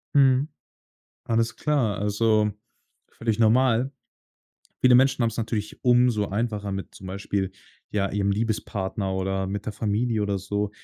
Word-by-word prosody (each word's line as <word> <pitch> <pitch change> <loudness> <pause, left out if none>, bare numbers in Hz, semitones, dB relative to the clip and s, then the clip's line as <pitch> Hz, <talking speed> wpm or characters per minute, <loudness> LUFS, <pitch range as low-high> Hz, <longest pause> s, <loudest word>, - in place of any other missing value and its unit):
Mhm. 135 0 +5 0.8
Alles 115 0 0
klar, 135 -9 0
also 105 +1 +2 0.6
völlig 115 -1 -2
normal. 125 +3 +3 0.9
Viele 125 -1 +6
Menschen 135 0 +3
haben's 115 -1 0
natürlich 110 -2 -3
umso 120 -4 +4
einfacher 105 -1 -2
mit 95 0 -6
zum 95 - -11
Beispiel, 95 0 -2 0.4
ja, 100 -2 0
ihrem 100 0 0
Liebespartner 100 -2 -2
oder 95 0 -1
mit 100 +1 -4
der 110 - -2
Familie 110 +2 0
oder 100 -1 -1
so, 100 +2 -2
105 Hz, 135 wpm, -25 LUFS, 100-120 Hz, 0.9 s, Viele